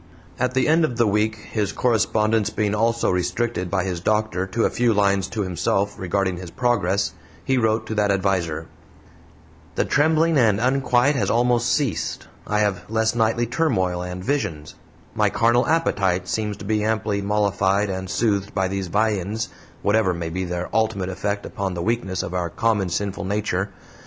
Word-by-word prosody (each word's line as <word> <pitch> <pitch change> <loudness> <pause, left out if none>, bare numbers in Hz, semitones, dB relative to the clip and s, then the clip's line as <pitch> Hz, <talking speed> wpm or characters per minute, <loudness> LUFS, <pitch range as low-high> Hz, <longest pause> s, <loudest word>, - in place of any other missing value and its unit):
At 125 0 0
the 130 - +2
end 160 +2 +4
of 125 -7 -1
the 120 - +4
week 105 +1 +1
his 105 -1 -3
correspondence 110 -1 +1
being 105 -1 -1
also 115 +2 +1
restricted 90 +2 -1
by 95 -1 0
his 90 -3 -3
doctor 105 -1 0
to 110 +4 0
a - - +3
few 120 -2 +2
lines 100 -2 +2
to 105 +2 -3
himself 95 +2 -1
regarding 95 0 -1
his 90 -1 -7
progress 100 -4 0 0.3
he 135 - +2
wrote 110 -1 +1
to 110 - -4
that 105 -1 +1
adviser: 90 -5 0 1.1
"The - - +1
trembling 160 +1 +3
and 110 -5 +3
unquiet 130 +2 +2
has - - 0
almost 120 0 +2
ceased; 130 -2 -1 0.2
I 105 0 +1
have 100 -3 -1
less 110 0 +1
nightly 115 0 +1
turmoil 100 - 0
and 90 +1 -6
visions; 80 - -2 0.4
my - - +2
carnal 120 +2 +2
appetite 95 - +1
seems 105 -1 -2
to 100 - -9
be 105 0 0
amply 105 -2 0
mollified 100 -1 +1
and 95 0 -4
soothed 100 -1 0
by 95 -1 +1
these 95 -1 -3
viands, 105 +2 0 0.3
whatever 100 -3 +2
may 85 -1 -4
be 95 +2 -2
their 90 0 -3
ultimate 110 -4 0
effect 100 +2 -3
upon 95 -2 -3
the 85 - -3
weakness 100 -4 -1
of 85 - -5
our 90 -2 -1
common 110 -4 0
sinful 100 +2 -2
nature. 100 -1 -1
105 Hz, 170 wpm, -23 LUFS, 95-115 Hz, 1.1 s, end